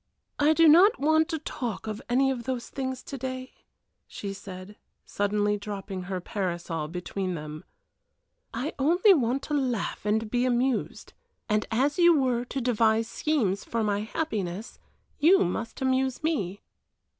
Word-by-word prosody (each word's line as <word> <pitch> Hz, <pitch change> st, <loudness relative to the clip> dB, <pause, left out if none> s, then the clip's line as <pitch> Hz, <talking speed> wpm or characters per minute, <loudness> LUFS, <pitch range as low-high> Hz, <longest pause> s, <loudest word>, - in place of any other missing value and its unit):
"I 295 Hz, +2 st, +5 dB
do 330 Hz, +1 st, +5 dB
not 365 Hz, +9 st, +7 dB
want 315 Hz, +3 st, +3 dB
to 325 Hz, -, -1 dB
talk 245 Hz, -8 st, -5 dB
of 215 Hz, +1 st, -5 dB
any 270 Hz, +2 st, +3 dB
of 240 Hz, -3 st, -4 dB
those 255 Hz, -2 st, -3 dB
things 260 Hz, -2 st, -4 dB
to 275 Hz, -, -7 dB
day," 260 Hz, 0 st, -5 dB, 0.5 s
she 200 Hz, -1 st, -6 dB
said, 190 Hz, +1 st, -9 dB, 0.3 s
suddenly 205 Hz, 0 st, 0 dB
dropping 195 Hz, -2 st, -6 dB
her 185 Hz, -1 st, -2 dB
parasol 175 Hz, -4 st, -3 dB
between 180 Hz, +2 st, -4 dB
them. 155 Hz, -1 st, -7 dB, 0.9 s
"I 255 Hz, +7 st, -3 dB
only 350 Hz, +8 st, +5 dB
want 265 Hz, -3 st, 0 dB
to 300 Hz, -, -4 dB
laugh 255 Hz, -7 st, -1 dB
and 215 Hz, +1 st, 0 dB
be 245 Hz, 0 st, +1 dB
amused, 250 Hz, 0 st, -1 dB, 0.3 s
and 210 Hz, -1 st, 0 dB
as 275 Hz, +8 st, +1 dB
you 340 Hz, -3 st, +6 dB
were 250 Hz, -2 st, +1 dB
to 270 Hz, -, -4 dB
devise 225 Hz, -2 st, +2 dB
schemes 230 Hz, -9 st, 0 dB
for 230 Hz, -1 st, -2 dB
my 205 Hz, -1 st, +1 dB
happiness, 215 Hz, -, -4 dB, 0.4 s
you 345 Hz, -, +5 dB
must 225 Hz, +8 st, -4 dB
amuse 260 Hz, +1 st, 0 dB
me." 205 Hz, -, -1 dB
240 Hz, 150 wpm, -27 LUFS, 205-275 Hz, 0.9 s, not